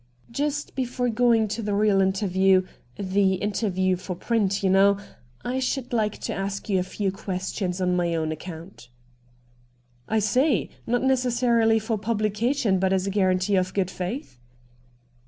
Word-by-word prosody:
* 125 - -28
Just 290 +3 -2
before 250 -1 -1
going 230 -1 +3
to 225 +3 -3
the 205 -2 -1
real 205 -1 +3
interview 190 -1 +3 0.2
— 120 - -35
the 195 0 +1
interview 190 -2 0
for 185 0 -6
print, 200 0 0
you 190 - +3
know 195 +1 +5 0.2
— 120 0 -31
I 250 +2 -1
should 260 -1 -2
like 215 -3 0
to - - -3
ask 195 0 -4
you 190 -2 +2
a 185 +1 -5
few 200 -2 +1
questions 185 -1 -3
on 180 -1 +1
my 170 -1 0
own 160 -1 -1
account.' 160 -4 -9 0.6
' 120 0 -36
I 220 - 0
see. 250 +6 +2 0.2
Not 245 +2 +1
necessarily 240 -3 +3
for 220 0 -2
publication, 215 +1 0
but 190 0 +1
as 190 -1 +1
a 195 - -1
guarantee 185 0 +2
of 185 0 -1
good 190 -2 0
faith.' 180 - -5
195 Hz, 170 wpm, -25 LUFS, 185-230 Hz, 0.6 s, know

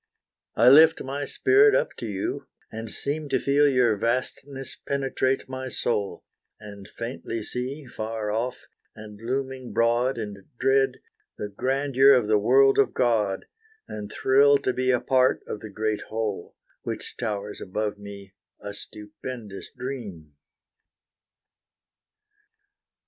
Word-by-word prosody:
I 115 - +4
lift 160 +4 +7
my 140 +2 -4
spirit 405 - +4
up - - 0
to 115 - -5
you, 100 -2 -4 0.2
and 115 0 -6
seem 145 +6 -4
To - - +2
feel 145 +1 +3
your 125 -5 +3
vastness 130 +4 -2
penetrate 135 -1 -1
my 130 0 -5
soul; 105 -4 -2 0.4
And 100 -2 -11
faintly 115 -1 -5
see, 130 +6 -4
far 110 -3 -4
off, 120 +3 -3 0.3
and 105 -1 -11
looming 130 +1 -4
broad 120 +3 +2
And 105 -3 -5 0.2
dread, 135 0 +2 0.4
the 105 - -4
grandeur 135 +4 +3
of 120 -4 +1
the 105 -1 +4
world 135 +6 +5
of 140 - +2
God, 110 -6 +1 0.4
And 105 -1 -7
thrill 140 +2 +5
to 130 - +1
be 130 +1 0
a 125 -1 +3
part 130 0 +2
of 105 - -5
the 110 - -9
great 110 +1 -2
whole, 110 -5 -4 0.3
Which - - -6
towers 105 -3 -4
above 105 +2 -3
me, 100 -1 -10 0.3
a 100 0 -7
stupendous 105 0 -8
dream. 105 - -7
120 Hz, 130 wpm, -25 LUFS, 105-135 Hz, 0.4 s, lift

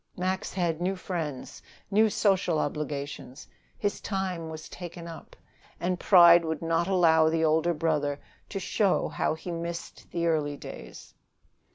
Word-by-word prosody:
Max 185 +1 -2
had 175 -3 -1
new 190 +2 0
friends, 165 -8 -5 0.3
new 215 +2 +4
social 190 -5 +2
obligations; 145 -2 -4 0.3
his 205 -1 -2
time 185 -5 -3
was 160 0 -8
taken 175 -1 -8
up. 165 -1 -10 0.4
And 180 0 -1
pride 175 -3 +7
would 160 -1 -3
not 165 +1 +1
allow 165 -4 +4
the 160 0 +1
older 160 +2 +2
brother 150 -3 0 0.3
to 195 - -4
show 195 +1 +1
how - - -1
he 175 +2 -7
missed 170 0 -6
the 170 -1 -2
early 150 -3 0
days. - - -10
170 Hz, 145 wpm, -28 LUFS, 160-180 Hz, 0.4 s, pride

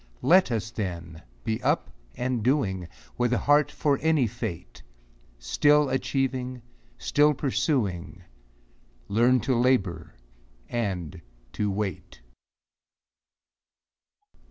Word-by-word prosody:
Let 185 -1 +5
us, 110 -1 -2
then, 85 -6 -5 0.2
be 110 0 -2
up 65 - 0 0.3
and 125 -1 -1
doing, 105 - 0 0.3
With 120 0 +2
a - - +3
heart 145 +1 +3
for 145 -1 0
any 160 -5 +3
fate; 90 - -6 0.6
Still 145 - +3
achieving, 130 -2 -2 0.3
still 150 0 +3
pursuing, 100 - -1 0.9
Learn 120 +4 +4
to 130 - 0
labor 100 - +1 0.5
and 95 - -3 0.3
to 105 -1 -1
wait. 95 - -4
120 Hz, 95 wpm, -26 LUFS, 95-135 Hz, 0.9 s, Let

